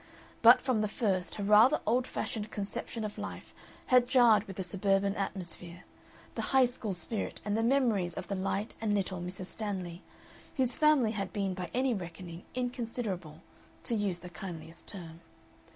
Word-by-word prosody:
But 235 +1 +8
from 255 -5 +1
the 215 - +1
first 195 -4 -1
her 205 - -4
rather 215 +8 +6
old 245 +4 +2
fashioned 215 -1 -4
conception 210 +2 -4
of 210 -1 -5
life - - -7 0.3
had 250 -1 +5
jarred 240 -5 +5
with 195 - -8
the 190 - -3
suburban 195 +2 +1
atmosphere, 180 -3 -4 0.5
the - - -3
High 265 -1 +4
School 240 -4 -3
spirit 200 +5 -4
and 205 0 0
the 225 - +1
memories 225 -8 +2
of - - -5
the - - -3
light 195 +2 -2
and 210 -2 +1
little 185 -2 -1
Mrs. 180 +1 -4
Stanley, 185 -4 -4 0.6
whose 255 -2 +2
family 300 -7 +4
had 195 -4 -3
been 195 -3 -1
by 180 -2 -5
any 255 0 +1
reckoning 175 -2 -7
inconsiderable 230 -10 -3 0.4
to - - -2
use 205 -5 0
the 180 - -8
kindliest 165 -3 -8
term. 170 -4 -9
205 Hz, 170 wpm, -31 LUFS, 180-235 Hz, 0.6 s, But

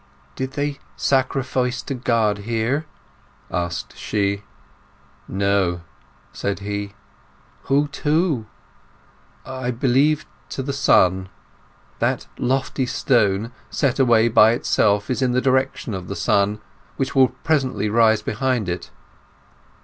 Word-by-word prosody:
"Did 130 0 -4
they 145 0 -2 0.2
sacrifice 130 -1 0
to - - -4
God 115 -4 +1
here?" 115 +8 -1 0.6
asked 85 -1 -3
she. 100 -1 -1 0.9
"No," 95 -3 +1 0.5
said 100 0 -2
he. 100 0 -4 0.7
"Who 145 +2 +2
to?" 150 -5 0 1.0
"I 130 -1 -4
believe 135 +5 +2 0.2
to 135 - -4
the 140 +1 -3
sun. 95 -8 +3 0.7
That - - 0
lofty 130 +1 0
stone 115 -4 +1 0.2
set 140 -2 0
away 115 -3 +5
by 110 -1 +6
itself 105 -2 +1
is 130 - -1
in 125 -1 +2
the 125 - +3
direction 130 -3 0
of 95 -2 -5
the 100 - -4
sun, 100 +4 +1 0.4
which 135 - -1
will 130 -1 +6
presently 135 -8 -1
rise 110 0 +3
behind 120 -1 -1
it." 90 0 -4
120 Hz, 115 wpm, -22 LUFS, 100-135 Hz, 1.0 s, by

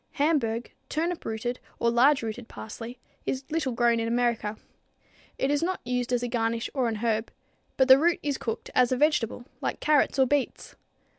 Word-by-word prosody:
Hamburg, 280 -7 0 0.2
turnip 335 +3 -1
rooted 240 +3 -3 0.2
or 235 - +2
large 265 +3 +4
rooted 225 +1 -5
parsley, 230 +3 -8 0.3
is 265 +1 -1
little 315 -5 0
grown 235 -1 +3
in 230 - -1
America. 235 -3 0 0.8
It 270 - +1
is 290 - +1
not 370 +2 -1
used 250 0 -1
as 245 -1 +1
a - - 0
garnish 230 -1 -1
or 260 -4 +1
an 225 - -1
herb, 220 0 -1 0.5
but 265 - +4
the 260 0 +9
root 340 +3 +3
is 285 -2 -1
cooked 225 -2 -4
as 250 -1 +4
a 255 - +2
vegetable 250 -5 +1 0.2
like - - -2
carrots 300 -2 +3
or 265 - +5
beets. 285 +1 -1
245 Hz, 180 wpm, -27 LUFS, 230-285 Hz, 0.8 s, the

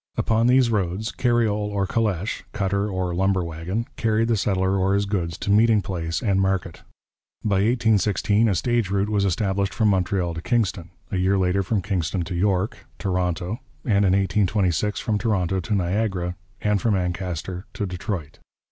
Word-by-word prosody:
Upon 115 +1 +2
these 125 -1 +4
roads 100 +2 -1
carriole 110 -4 +1
or 100 -1 0
calèche, 105 -2 -1
'cutter' 100 0 0
or 95 -2 -2
'lumber 95 +1 +1
wagon,' 85 +7 -3
carried 115 0 +1
the 115 - +3
settler 95 -1 +1
or 95 +1 +2
his 100 0 +1
goods 90 -5 -2
to 100 - -2
meeting 110 +1 +5
place 85 -2 -3
and 100 -3 +2
market. 95 -3 -1 0.6
By 100 -2 +2
1816 110 -1 +2
a 95 - +1
stage 120 +1 0
route 100 +1 0
was 100 -2 +1
established 100 +1 0
from 110 -2 +3
Montreal 95 -2 0
to 80 - -5
Kingston, 95 -6 0 0.2
a 95 - -1
year 95 +2 +2
later 95 +1 +2
from 95 +1 -1
Kingston 90 -2 -1
to 90 - -6
York 95 +2 0
(Toronto), 90 +2 -1 0.3
and 105 -4 +3
in 95 -2 +3
1826 100 0 +1
from 105 -2 -1
Toronto 95 -5 0
to 90 +4 -1
Niagara 90 -1 -1 0.3
and 105 -2 +1
from 110 -3 +2
Ancaster 90 0 -3
to 105 - -2
Detroit. 90 -4 -5
100 Hz, 165 wpm, -23 LUFS, 90-105 Hz, 0.6 s, meeting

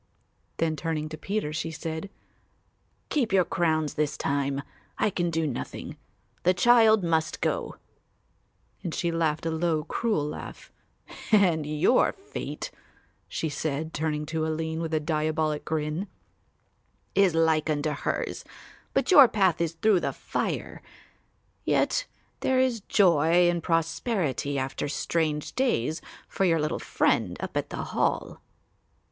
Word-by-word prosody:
Then 160 -1 +1
turning 155 0 -3
to 155 - -6
Peter 195 -3 -2
she 160 +1 -2
said: 160 +3 -5 1.0
"Keep 255 -8 0
your 190 -2 +4
crowns 155 -3 0
this 150 -1 -1
time; 140 0 -1 0.3
I 215 - +1
can 175 -2 0
do 165 -1 0
nothing; 140 -5 -5 0.5
the 180 +1 +3
child 220 0 +5
must 160 -2 0
go," - - -1 1.1
and 170 -4 -4
she 170 - 0
laughed 160 -1 0
a 165 - 0
low 160 -1 0
cruel 205 -2 -1
laugh, 150 - -8 0.6
"and 175 -8 +4
your 155 +11 +3
fate," 390 +1 -6 0.6
she 160 - -2
said, 155 +1 -3
turning 150 -1 -1
to 160 +1 -2
Aline 160 +1 -2
with 165 -1 -3
a - - +2
diabolic 155 -1 -1
grin, 155 +5 -2 1.1
"is 195 -4 +4
like 160 -1 +2
unto 150 0 0
hers; 145 - -3 0.5
but - - +2
your 285 -8 +10
path 190 -7 +2
is 165 -1 0
through 195 +3 +3
the - - -2
fire; - - -3 0.8
yet - - +1 0.3
there 260 0 +2
is 255 -4 +1
joy 175 -3 +4
and 175 -1 +1
prosperity 165 - 0
after 135 +1 -2
strange 150 0 -1
days 160 - 0 0.3
for - - -2
your 165 -3 +3
little 150 0 -1
friend - - +1
up - - -5
at - - -1
the - - -4
Hall." - - -1
160 Hz, 135 wpm, -27 LUFS, 155-180 Hz, 1.1 s, your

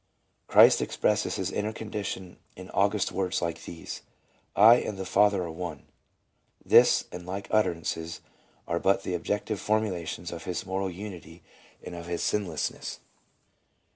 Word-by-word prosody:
Christ - - +7
expresses - - 0
his - - -2
inner 105 +1 -1
condition 100 -4 -5 0.2
in - - -10
august - - +1
words 95 -1 -1
like 85 -1 -3
these: 85 - -7 0.5
"I 115 +4 +8
and 105 -4 -3
the 95 - -4
Father 100 0 +3
are 85 - -5
one." 80 -3 -6 0.8
This - - +6
and 90 0 -7
like 95 +2 -5
utterances 85 -5 -1 0.5
are 85 - 0
but 95 +1 +2
the 90 - -3
objective 105 +4 -2
formulations 95 -5 -1
of 85 - -7
his 90 -2 -3
moral 95 +1 -2
unity, 90 -3 -9 0.4
of 85 -1 -7
his 85 -1 -2
sinlessness. 95 -7 -2
95 Hz, 140 wpm, -28 LUFS, 85-105 Hz, 0.8 s, I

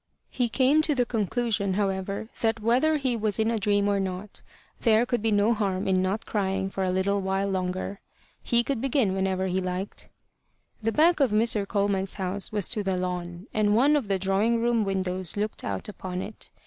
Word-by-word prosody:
He 245 -2 0
came 270 +6 +3
to 310 -2 +2
the 250 -2 +2
conclusion, 215 -3 -1
however, 195 +1 -2
that, 225 -1 +1
whether 255 +8 +2
he 260 -4 0
was 215 -3 0
in 220 +1 +1
a 230 - 0
dream 205 0 +2
or 200 -1 +1
not, 190 +1 -5 0.4
there 225 0 +4
could 245 -2 -1
be 225 - +1
no 210 +2 +3
harm 195 -4 -1
in 185 -1 +2
not 190 +4 -1
crying 195 -2 -1
for 195 - -2
a 185 - 0
little 195 +2 +1
while 195 +1 0
longer: 185 +1 -3 0.4
he 235 0 +2
could 265 -2 -2
begin 260 -7 +1
whenever 190 0 0
he 190 0 0
liked. 185 +2 -5 0.7
The 225 +1 0
back 325 +6 +4
of 275 -3 +4
Mr. 215 -1 +1
Coleman's 200 -2 0
house 190 0 -2
was 205 -4 -1
to 215 - 0
the 190 -2 -1
lawn, 180 0 -4
and 210 -1 +2
one 280 +6 +4
of 275 -7 0
the 195 -1 +1
drawing 195 +5 +1
room 235 -1 +2
windows 185 -2 -3
looked 210 +1 -2
out 95 -2 -3
upon 185 -2 -5
it. 215 - -9
205 Hz, 200 wpm, -26 LUFS, 190-230 Hz, 0.7 s, there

